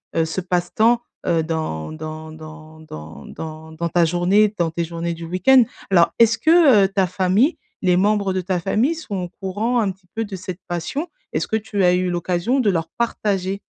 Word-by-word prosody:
heu, 165 - +2
ce 160 +4 -3
passe-temps, 185 +7 +1 0.2
heu, 165 -1 +2
dans 155 - -3
dans 155 0 -7
dans 155 0 -12
dans 75 - -10
dans 160 0 -8
dans 170 +2 -3
ta 175 0 +3
journée, 185 +5 +3
dans 170 -1 +2
tes 170 +1 -2
journées 170 +1 -4
du 165 0 -8
week-end. 185 +10 +5 0.3
Alors, 175 -3 +4
est-ce 230 -1 +5
que, 295 - +5
heu, - - +2
ta 195 -1 0
famille, 190 - +2 0.2
les 180 -2 +3
membres 200 0 +2
de 185 - -1
ta 180 0 -1
famille 215 - +1
sont 315 -11 -6
au 175 - -6
courant 205 +6 -2
un 205 -4 +1
petit 185 0 -18
peu 225 - -2
de 205 -3 -6
cette 185 -1 -7
passion? 175 - -3 0.3
Est-ce - - -1
que - - -1
tu 210 -2 -1
as 180 0 +5
eu 180 0 +1
l'occasion 175 +8 0
de 230 -5 +2
leur 165 -4 -1
partager? 200 -4 -1
185 Hz, 200 wpm, -21 LUFS, 165-210 Hz, 0.3 s, week-end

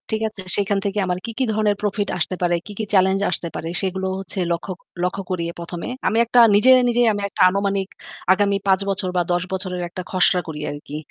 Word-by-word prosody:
ঠিক 220 - -4
আছে? 210 -2 -11 0.2
সেখান 200 0 +1
থেকে 200 +1 -1
আমার 180 0 -2
কি, 230 - -4
কি - - +2
ধরনের 210 -1 +1
প্রফিট 205 0 -1
আসতে 180 +2 -2
পারে? 175 -1 +2
কি, 210 - -8
কি 220 - -1
চ্যালেঞ্জ 190 0 +4
আসতে 170 - -2
পারে? 165 - -4
সেগুলো 190 0 -2
হচ্ছে 195 0 -5
লক্ষ্য, 170 +3 -3 0.3
লক্ষ্য 180 +2 -1
করি 180 -2 -1 0.2
১ম 170 0 -6
এ। - - -4 0.2
আমি 220 - +1
একটা 240 +1 +3 0.2
নিজে, 210 +6 +6 0.2
নিজেই 240 0 +3
আমি 205 - -3
একটা - - -4
আনুমানিক 195 0 -1 0.5
আগামী 200 0 +1
৫ 190 -1 +4
বছর 190 -1 -1
বা - - +4
১০ 175 0 +1
বছরের 185 -1 -3
একটা 185 - -6
খসড়া 185 -1 +3
করি 155 -2 -6
আরকি। 145 0 -8
190 Hz, 215 wpm, -21 LUFS, 180-205 Hz, 0.5 s, নিজে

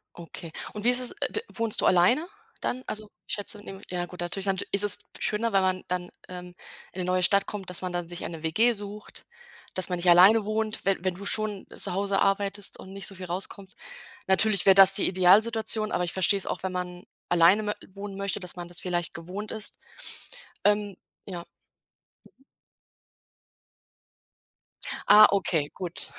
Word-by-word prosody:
Okay. 165 -1 -9 0.2
Und 210 +1 -6
wie 245 - +6
ist 250 0 +5
es, 250 - 0
äh, - - -3
d 440 - -1
wohnst 230 -2 -1
du - - +1
alleine 185 - +4 0.3
dann? 255 +1 -3
Also, 215 0 -6 0.2
ich - - 0
schätze 205 0 -6
in 195 -1 -10
ja 175 -1 -2
gut, 180 0 -10
natürlich 180 +3 -3
dann 190 -1 0
sch - - -2
ist 200 +1 +7
es 205 0 +3 0.2
schöner, 220 +1 -1
wenn 195 - +4
man 185 0 0
dann, 180 0 -3 0.2
ähm, 180 -1 -9 0.4
in 185 - -5
'ne - - -3
neue 180 0 +1
Stadt 200 +2 +3
kommt, 195 -3 -6
dass 180 - -4
man 185 -1 -3
dann 175 -1 -3
sich 175 0 -6
eine 165 -2 -6
WG 220 +10 +3
sucht, 205 0 -9 0.5
dass 185 - -1
man 180 - -1
nicht 175 +1 0
alleine 200 +5 +7
wohnt, 215 0 -2
wenn 195 -2 0
wenn 185 -1 0
du 200 +3 -10
schon 210 -2 -2
zu - - -1
Hause 195 +1 0
arbeitest 200 0 0
und 190 - -11
nicht 195 -1 -3
so 195 - -5
viel 185 -1 -8
rauskommst. 190 +2 -5 0.5
Natürlich 200 0 +3
wär 195 - +8
das 195 0 +8
die 195 - +3
Idealsituation, 215 +4 +3
aber 180 - 0
ich 175 - -1
verstehe 190 +1 +2
es 195 - -4
auch, - - -3
wenn 190 - -2
man 180 0 -5 0.3
alleine 175 +5 +5
mö 210 - -1 0.2
wohnen 200 0 -7
möchte, 200 +1 -2
dass 180 -2 -5
man 175 -1 -7
das 175 0 -5
vielleicht 175 -2 -2
gewohnt 185 +6 -7
ist. 215 -2 -4 0.9
Ähm, 205 -1 +2 0.3
ja. 175 -4 -7 0.8
Mhm. 270 - -24 2.7
Ah, 210 +1 +10
okay, 170 -7 +1
gut. 180 -2 -4
195 Hz, 190 wpm, -27 LUFS, 180-210 Hz, 2.7 s, Ah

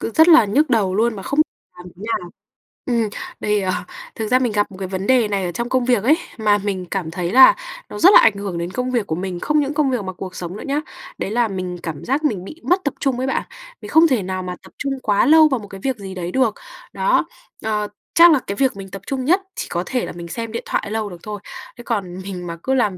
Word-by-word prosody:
cứ - - -3
rất 320 +2 +6
là 325 -8 +8
nhức 270 +9 +1
đầu 205 -6 +2
luôn 225 +2 +1
mà 195 - -7
không 285 +2 0 0.4
làm 180 - -11
thế 190 - -13
nào. 180 -6 -2 0.6
Ừm, 230 -4 +1 0.3
đây, 210 -1 +1
ờ, 185 -1 0 0.4
thực 220 - -3
ra 255 +3 +4
mình 245 -3 0
gặp 205 -1 0
một 185 - -11
cái 190 -1 -4
vấn 190 +1 -4
đề 255 -4 +4
này 200 -2 -1
ở 175 - -2
trong 235 +7 -4
công 255 -1 +1
việc 245 -4 +2
ấy, 300 +6 +4 0.2
mà 210 -2 +3
mình 195 -2 -3
cảm 180 -5 -2
thấy 175 0 -3
là 260 - +8 0.3
nó - - -7
rất 375 +4 +7
là - - +10
ảnh 225 - +5
hưởng 200 -3 -4
đến 170 +1 -3
công 250 +5 -2
việc 235 -5 0
của 160 - -1
mình, 180 0 -4
không 300 +8 +1
những 285 0 -1
công 290 -2 +2
việc 245 -5 -1
mà 185 - -5
cuộc 185 +1 -8
sống 175 +1 -6
nữa - - -8
nhá. 285 +2 0 0.4
Đấy 195 - -3
là 235 +1 +2
mình 185 -3 -4
cảm 160 -2 -5
giác 275 +4 0
mình 210 -12 0
bị 310 - -11
mất 365 +2 +2
tập 285 - -1
trung 270 -3 0
ấy 260 +1 -2
bạn, - - 0 0.4
mình - - -8
không 325 +1 +6
thể 250 -8 +1
nào 185 0 -3
mà 180 0 -5
tập 190 - -15
trung 275 -1 -2
quá 205 -2 +3
lâu 315 +1 +7
vào 265 -5 0
một 205 - -10
cái 195 -1 -10
việc 265 -3 -1
gì 195 -2 -8
đấy 175 -1 -4
được. 250 -3 +2 0.4
Đó. - - +2 0.4
Ờ, 210 -1 0 0.3
chắc 340 +1 +8
là 300 - +4
cái 200 - -2
việc 265 +3 +2
mình 195 -1 -8
tập 195 0 -7
trung 265 -2 -2
nhất 365 +7 +3
chỉ - - -4
có 175 - -2
thể 255 -2 -1
là - - -6
mình 170 0 -7
xem 230 +5 -5
điện 230 - -4
thoại 205 - -2
lâu 220 -1 -2
được 175 - -9
thôi. 210 -1 -6 0.4
Thế 240 - -10
còn 195 -7 -3
mình 185 -2 -6
mà 170 0 -5
cứ 265 - 0
làm 215 -8 +1
215 Hz, 280 wpm, -20 LUFS, 190-260 Hz, 0.6 s, là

